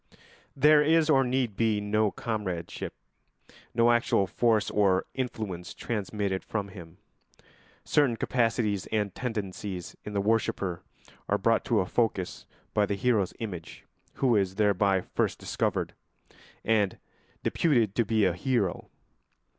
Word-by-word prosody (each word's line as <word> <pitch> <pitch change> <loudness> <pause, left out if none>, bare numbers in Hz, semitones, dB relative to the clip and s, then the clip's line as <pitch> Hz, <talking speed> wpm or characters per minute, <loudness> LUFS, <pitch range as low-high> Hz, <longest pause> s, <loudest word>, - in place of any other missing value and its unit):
There 150 +2 +6
is 160 +1 +4
or 135 -2 +5
need 125 -4 0
be 110 -1 +2
no 105 +1 +1
comradeship, 100 -7 -4 0.8
no 115 0 +5
actual 120 -3 +2
force 110 +3 +1
or 95 -3 +3
influence 110 -9 -4
transmitted 100 -3 -2
from 100 -2 -3
him. 85 -3 -12 0.9
Certain 140 -5 +3
capacities 115 -5 0
and 105 -3 -1
tendencies 100 -6 -5
in 105 - -7
the 100 - 0
worshipper 100 -4 0 0.5
are - - +3
brought - - +2
to - - +2
a - - -1
focus 100 -4 -1 0.3
by 105 -1 +2
the 100 - -1
hero's 105 -3 +1
image, 90 -7 -7 0.3
who 125 -4 +2
is 95 -2 +1
thereby 100 -2 +2
first - - -1
discovered - - -2 0.7
and 105 -3 +2 0.5
deputed 120 - +2
to 115 - +2
be 110 -1 +2
a 90 - +2
hero. 100 0 -1
105 Hz, 130 wpm, -28 LUFS, 95-120 Hz, 0.9 s, There